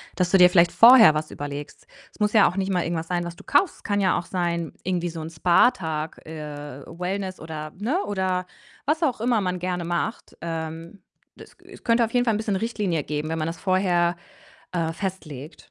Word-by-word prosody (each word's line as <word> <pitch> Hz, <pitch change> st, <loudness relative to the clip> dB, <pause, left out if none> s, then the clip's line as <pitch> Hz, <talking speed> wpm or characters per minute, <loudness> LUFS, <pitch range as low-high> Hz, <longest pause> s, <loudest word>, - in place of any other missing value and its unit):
Dass 180 Hz, -1 st, +1 dB
du 195 Hz, -, +6 dB
dir 180 Hz, 0 st, +8 dB
vielleicht 170 Hz, -1 st, +4 dB
vorher 230 Hz, -7 st, +8 dB
was 155 Hz, 0 st, -3 dB
überlegst. 145 Hz, 0 st, -7 dB, 0.3 s
Es -, -, -22 dB
muss 210 Hz, +1 st, +1 dB
ja 215 Hz, -3 st, +6 dB
auch 180 Hz, -, -3 dB
nicht 195 Hz, 0 st, -1 dB
mal 180 Hz, -2 st, +1 dB
irgendwas 165 Hz, -1 st, -3 dB
sein, 175 Hz, 0 st, -1 dB
was 175 Hz, 0 st, -6 dB
du -, -, -14 dB
kaufst. 310 Hz, +5 st, +2 dB
Es -, -, -22 dB
kann 205 Hz, 0 st, 0 dB
ja 185 Hz, -2 st, +2 dB
auch 175 Hz, -, -8 dB
sein 170 Hz, -3 st, -2 dB
irgendwie 175 Hz, -1 st, -1 dB
so 165 Hz, -, -7 dB
'n 160 Hz, -, -6 dB
Spa-Tag, 160 Hz, -2 st, +1 dB
äh, 145 Hz, -3 st, -8 dB
Wellness 185 Hz, +2 st, -4 dB
oder 155 Hz, -1 st, -7 dB
ne, 275 Hz, -, 0 dB
oder 185 Hz, -2 st, -1 dB, 0.4 s
was 310 Hz, +4 st, 0 dB
auch 260 Hz, -7 st, +1 dB
immer 235 Hz, -2 st, +2 dB
man 180 Hz, -1 st, -2 dB
gerne 180 Hz, -1 st, -3 dB
macht. 175 Hz, +7 st, -3 dB
Ähm, 165 Hz, +2 st, -6 dB, 0.4 s
es -, -, -14 dB
es -, -, -14 dB
könnte 230 Hz, 0 st, +3 dB
auf 225 Hz, -, -9 dB
jeden 245 Hz, 0 st, +2 dB
Fall 225 Hz, -, +2 dB
'n -, -, 0 dB
bisschen 215 Hz, -2 st, -1 dB
Richtlinie 195 Hz, -7 st, -1 dB
geben, 150 Hz, +2 st, -3 dB
wenn 160 Hz, 0 st, -2 dB
man 155 Hz, -, -1 dB
das 165 Hz, -, -5 dB
vorher, 180 Hz, -2 st, +1 dB, 0.6 s
äh, 165 Hz, -2 st, -1 dB
festlegt. 155 Hz, -6 st, -6 dB
180 Hz, 210 wpm, -24 LUFS, 160-200 Hz, 0.6 s, dir